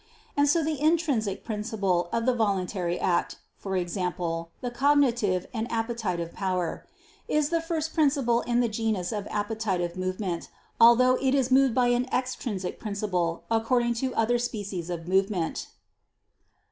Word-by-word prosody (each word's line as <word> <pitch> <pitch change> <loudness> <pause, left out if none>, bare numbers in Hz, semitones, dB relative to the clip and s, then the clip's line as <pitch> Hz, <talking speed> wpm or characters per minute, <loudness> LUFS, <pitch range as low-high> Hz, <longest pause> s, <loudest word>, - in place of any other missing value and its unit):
And 285 0 +3
so 330 +2 +3
the 305 -2 -2
intrinsic 295 - +1
principle 210 -5 -1
of 230 0 0
the 255 - +3
voluntary 190 -5 -1
act, 175 -2 0 0.3
i.e. 190 -2 0
the 175 +3 -3
cognitive 240 -9 +2
and 230 0 -3
appetitive 225 -8 -2
power, 185 -3 -2 0.4
is 300 -1 +1
the 335 -1 +1
first 320 -1 -3
principle 275 -6 +2
in 240 0 +1
the 240 - +2
genus 215 -5 -1
of 210 -2 -4
appetitive 205 -5 -2
movement, 185 -1 -3 0.3
although 255 +2 +6
it 270 0 +2
is 265 -2 +1
moved 265 -2 +4
by 250 -1 +3
an 245 +1 +1
extrinsic 240 -7 -2
principle 190 -5 -2
according 235 +1 +2
to 255 +2 -2
other 240 +2 +2
species 205 -7 -4
of 170 -1 -5
movement. 190 -2 0
220 Hz, 140 wpm, -27 LUFS, 185-250 Hz, 0.4 s, although